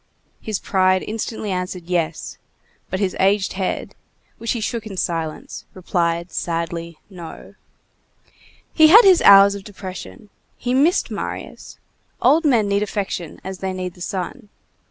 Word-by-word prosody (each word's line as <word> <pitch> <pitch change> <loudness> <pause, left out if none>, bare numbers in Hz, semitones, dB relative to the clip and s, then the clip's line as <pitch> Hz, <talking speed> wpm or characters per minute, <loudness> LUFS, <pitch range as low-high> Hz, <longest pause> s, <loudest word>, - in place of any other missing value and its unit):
His 215 -2 -3
pride 185 -1 +1
instantly 220 -1 -4
answered 180 -1 -4
"yes," 170 -3 -2 0.5
but 185 - -3
his 195 -2 -1
aged 195 +1 +2
head, 185 -1 -3 0.5
which 230 - -1
he 235 - -3
shook 225 0 -3
in 195 -3 -8
silence, 165 -3 -4
replied 170 -1 -1
sadly 170 -1 -4
"no." 175 -5 -11 1.2
He 315 -1 +7
had 425 +8 +8
his 370 -3 +6
hours 200 0 +8
of 200 -1 -7
depression. 205 +1 -9 0.3
He 245 0 -2
missed 305 +8 +2
Marius. - - -7 0.4
Old 325 +2 +4
men 235 -8 +3
need 200 0 +1
affection 195 -5 -4
as 190 0 -7
they 190 -1 -3
need 185 -1 -5
the 180 - -17
sun. 200 +6 -5
190 Hz, 140 wpm, -21 LUFS, 180-215 Hz, 1.2 s, had